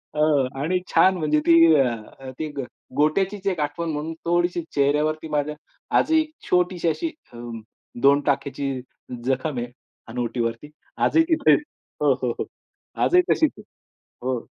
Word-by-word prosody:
हां. 150 Hz, -3 st, +3 dB
आणि 180 Hz, +5 st, +1 dB
छान 185 Hz, -1 st, +5 dB
म्हणजे 150 Hz, -2 st, +1 dB
ती 170 Hz, -, +7 dB, 0.2 s
अ, 130 Hz, 0 st, -2 dB
ती 155 Hz, -, -2 dB
ग 135 Hz, -, -1 dB, 0.3 s
गोट्याचीच 190 Hz, +7 st, +1 dB
एक 185 Hz, -5 st, 0 dB
आठवण 150 Hz, +3 st, -2 dB
म्हणून 155 Hz, +2 st, -3 dB
थोडीशी 175 Hz, 0 st, +1 dB
चेहऱ्यावरती 150 Hz, +3 st, +1 dB
माझ्या 150 Hz, 0 st, -1 dB, 0.4 s
आजही 320 Hz, 0 st, +4 dB
एक 310 Hz, 0 st, -7 dB, 0.2 s
छोटीशी 180 Hz, -1 st, +1 dB
अशी 320 Hz, -, -2 dB, 0.2 s
अं, 120 Hz, -1 st, -7 dB, 0.4 s
2 140 Hz, +1 st, +5 dB
टाक्याची 140 Hz, 0 st, -1 dB, 0.5 s
जखम 135 Hz, +1 st, -1 dB
आहे 120 Hz, -, -3 dB, 0.4 s
हनुवटीवरती. 120 Hz, +2 st, -3 dB, 0.3 s
आजही 325 Hz, -, +4 dB
तिथे 320 Hz, -3 st, +4 dB
आहे, -, -, +6 dB, 0.4 s
हो, -, -, +4 dB
हो, -, -, -2 dB
हो. -, -, -1 dB, 0.6 s
आजही 360 Hz, +1 st, +5 dB
तशीच 315 Hz, -3 st, +3 dB
आहे. -, -, -12 dB, 0.6 s
हो. 125 Hz, -3 st, -2 dB
150 Hz, 145 wpm, -23 LUFS, 135-175 Hz, 0.6 s, ती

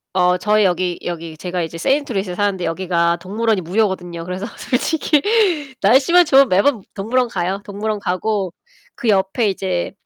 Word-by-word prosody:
어 180 Hz, -1 st, +3 dB
저희 210 Hz, +3 st, +2 dB
여기 180 Hz, -1 st, 0 dB
여기 165 Hz, -2 st, -5 dB
제가 175 Hz, +2 st, -3 dB
이제 165 Hz, +1 st, -6 dB
세인트루이스에 220 Hz, -, -1 dB
사는데 200 Hz, -2 st, -1 dB
여기가 170 Hz, 0 st, 0 dB
동물원이 210 Hz, +3 st, -1 dB
무료거든요. 180 Hz, -2 st, -2 dB
그래서 185 Hz, +3 st, -4 dB
솔직히 295 Hz, +2 st, 0 dB, 0.6 s
날씨만 270 Hz, -, +5 dB
좋으면 270 Hz, -2 st, +5 dB
매번 205 Hz, +4 st, +2 dB
동물원 235 Hz, +5 st, 0 dB
가요. 190 Hz, 0 st, -2 dB
동물원 210 Hz, +1 st, -3 dB
가고 190 Hz, -1 st, -2 dB, 0.4 s
그 240 Hz, -4 st, -2 dB
옆에 195 Hz, +2 st, +2 dB
이제 185 Hz, -2 st, -2 dB
195 Hz, 370 characters per minute, -19 LUFS, 180-220 Hz, 0.6 s, 날씨만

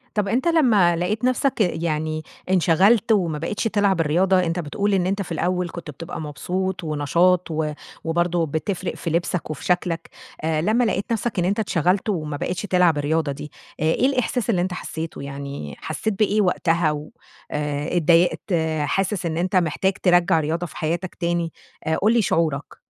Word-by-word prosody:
طيب 205 Hz, -1 st, +1 dB
أنتَ 245 Hz, -, 0 dB
لمّا 230 Hz, -, +4 dB
لقيت 190 Hz, +7 st, -1 dB
نفسَك 255 Hz, -1 st, +1 dB
يعني 155 Hz, -4 st, -1 dB, 0.3 s
انشغلت 190 Hz, +5 st, +4 dB
وما 175 Hz, -8 st, +2 dB
بقيتش 170 Hz, +7 st, -3 dB
تلعب 205 Hz, -5 st, +2 dB
الرياضة 180 Hz, +5 st, +3 dB
أنتَ 175 Hz, -1 st, 0 dB
بتقول 200 Hz, +6 st, -1 dB
إن 185 Hz, -2 st, +2 dB
أنتَ 195 Hz, +2 st, -1 dB
في 180 Hz, -, -7 dB
الأول 180 Hz, +1 st, 0 dB
كنت 170 Hz, -2 st, -8 dB
بتبقى 160 Hz, +3 st, -7 dB
مبسوط 180 Hz, +6 st, -3 dB
ونشاط، 170 Hz, +4 st, +2 dB
و 155 Hz, -1 st, -1 dB, 0.3 s
وبرضه 170 Hz, +1 st, +1 dB
بتفرق 175 Hz, +4 st, -3 dB
في 170 Hz, -, -4 dB
لبسَك 170 Hz, 0 st, -1 dB
وفي 155 Hz, -, -6 dB
شكلَك. 175 Hz, -2 st, 0 dB, 0.3 s
آآ، 155 Hz, 0 st, 0 dB
لمّا 220 Hz, +8 st, +2 dB
لقيت 205 Hz, -1 st, -1 dB
نفسَك 230 Hz, -2 st, -1 dB
إن 175 Hz, -, +1 dB
أنتَ 200 Hz, +4 st, 0 dB
اتشغلت 190 Hz, +1 st, +1 dB
وما 155 Hz, -6 st, -2 dB
بقيتش 180 Hz, +4 st, -3 dB
تلعب 180 Hz, -5 st, +3 dB
الرياضة 150 Hz, 0 st, 0 dB
دي، 150 Hz, +2 st, -7 dB, 0.3 s
آآ -, -, -2 dB
إيه 160 Hz, +10 st, +2 dB
الإحساس 250 Hz, -3 st, 0 dB
اللي 185 Hz, -6 st, +2 dB
أنتَ 180 Hz, +1 st, -1 dB
حسّيته، 160 Hz, -4 st, -5 dB
يعني 140 Hz, -, -6 dB
حسيت 220 Hz, -, -2 dB
بإيه 215 Hz, 0 st, +3 dB
وقتها؟ 170 Hz, -4 st, +2 dB
و 150 Hz, 0 st, -5 dB, 0.4 s
آآ 150 Hz, +3 st, -2 dB
اتضايقت 175 Hz, +4 st, +3 dB, 0.3 s
حاسس 195 Hz, +4 st, -1 dB
إن 165 Hz, -1 st, -2 dB
أنتَ 180 Hz, +3 st, -1 dB
محتاج 185 Hz, +2 st, +2 dB
ترجّع 175 Hz, -2 st, +4 dB
الرياضة 160 Hz, +3 st, -1 dB
في -, -, -12 dB
حياتَك 170 Hz, +3 st, -2 dB
تاني؟ 170 Hz, -1 st, -1 dB, 0.3 s
آآ، 160 Hz, -, +2 dB
قل 215 Hz, +3 st, +3 dB
لي 235 Hz, -, +4 dB
شعورك. 155 Hz, -7 st, -1 dB
175 Hz, 175 wpm, -23 LUFS, 160-195 Hz, 0.4 s, لمّا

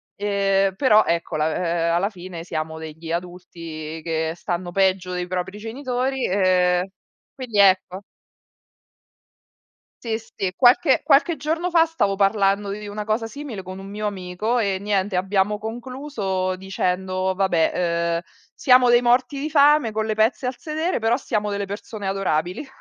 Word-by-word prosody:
ehm, 195 Hz, -1 st, +1 dB
però 215 Hz, -3 st, +4 dB
ecco 170 Hz, -1 st, -1 dB
la 155 Hz, +1 st, 0 dB, 0.4 s
ehm, -, -, +2 dB
alla 190 Hz, +4 st, +1 dB
fine 180 Hz, -4 st, -9 dB
siamo 160 Hz, -2 st, -4 dB
degli 160 Hz, +1 st, -8 dB
adulti 165 Hz, -3 st, -6 dB
che 160 Hz, -1 st, -1 dB
stanno 175 Hz, 0 st, -4 dB
peggio 185 Hz, -1 st, +1 dB
dei 180 Hz, 0 st, -3 dB
propri 185 Hz, +2 st, -4 dB
genitori, 255 Hz, +3 st, -2 dB
ehm, 180 Hz, -2 st, +2 dB, 0.5 s
quindi 240 Hz, -6 st, -3 dB
ecco. 190 Hz, -1 st, +4 dB, 2.0 s
Sì, 225 Hz, -1 st, -1 dB
sì. 195 Hz, -4 st, -5 dB
Qualche 265 Hz, -, +5 dB
qualche 310 Hz, +3 st, +4 dB
giorno 330 Hz, +4 st, -1 dB
fa 335 Hz, -2 st, +5 dB
stavo 205 Hz, -12 st, 0 dB
parlando 200 Hz, 0 st, +2 dB
di 210 Hz, +1 st, -6 dB
una 205 Hz, +1 st, -5 dB
cosa 220 Hz, +1 st, -1 dB
simile 265 Hz, -5 st, -7 dB
con 185 Hz, 0 st, -8 dB
un 195 Hz, -, -9 dB
mio 210 Hz, +2 st, -4 dB
amico 200 Hz, +4 st, -2 dB
e 200 Hz, -5 st, 0 dB
niente 200 Hz, -1 st, -1 dB
abbiamo 195 Hz, +2 st, +1 dB
concluso 225 Hz, -5 st, -3 dB
dicendo: 185 Hz, 0 st, -2 dB
"Vabbè, 185 Hz, -4 st, +2 dB, 0.4 s
ehm, -, -, 0 dB, 0.3 s
siamo 250 Hz, -2 st, +4 dB
dei 240 Hz, 0 st, +5 dB
morti 250 Hz, +3 st, +2 dB
di 290 Hz, -, -2 dB
fame 290 Hz, -4 st, +5 dB
con 220 Hz, 0 st, -2 dB
le 215 Hz, -, -1 dB
pezze 225 Hz, +4 st, +1 dB
al 250 Hz, -, -3 dB
sedere 315 Hz, +3 st, -2 dB
però 225 Hz, +2 st, +1 dB
siamo 210 Hz, -6 st, -2 dB
delle 200 Hz, 0 st, -2 dB
persone 205 Hz, 0 st, -6 dB
adorabili." 190 Hz, -, -1 dB
200 Hz, 150 wpm, -22 LUFS, 185-240 Hz, 2.0 s, Qualche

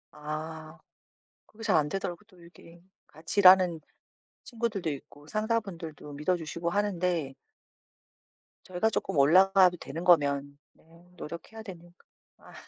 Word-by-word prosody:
아. 155 Hz, +1 st, -7 dB, 0.7 s
그게 225 Hz, +1 st, -14 dB
잘 205 Hz, -5 st, +2 dB
안 150 Hz, -1 st, +1 dB
되더라고요. 185 Hz, +2 st, -5 dB
또 185 Hz, -5 st, -21 dB
이게 170 Hz, 0 st, -17 dB, 0.3 s
같이 160 Hz, +6 st, -4 dB
일하는 185 Hz, -3 st, +7 dB, 0.7 s
친구들도 225 Hz, -8 st, -3 dB
있고 145 Hz, +1 st, -10 dB
상사분들도 195 Hz, -9 st, -3 dB
믿어주시고 170 Hz, +2 st, -2 dB
하는데 180 Hz, -7 st, -1 dB, 1.3 s
저희가 185 Hz, +4 st, 0 dB
쪼끔 180 Hz, -, -3 dB
올라가도 185 Hz, +5 st, +5 dB
되는 165 Hz, +1 st, -7 dB
거면 140 Hz, -4 st, +2 dB, 0.2 s
네 -, -, -28 dB, 0.3 s
노력해야 170 Hz, +8 st, -9 dB
되니까. 175 Hz, -3 st, -13 dB, 0.3 s
아. -, -, -17 dB
175 Hz, 280 characters per minute, -28 LUFS, 155-195 Hz, 1.3 s, 일하는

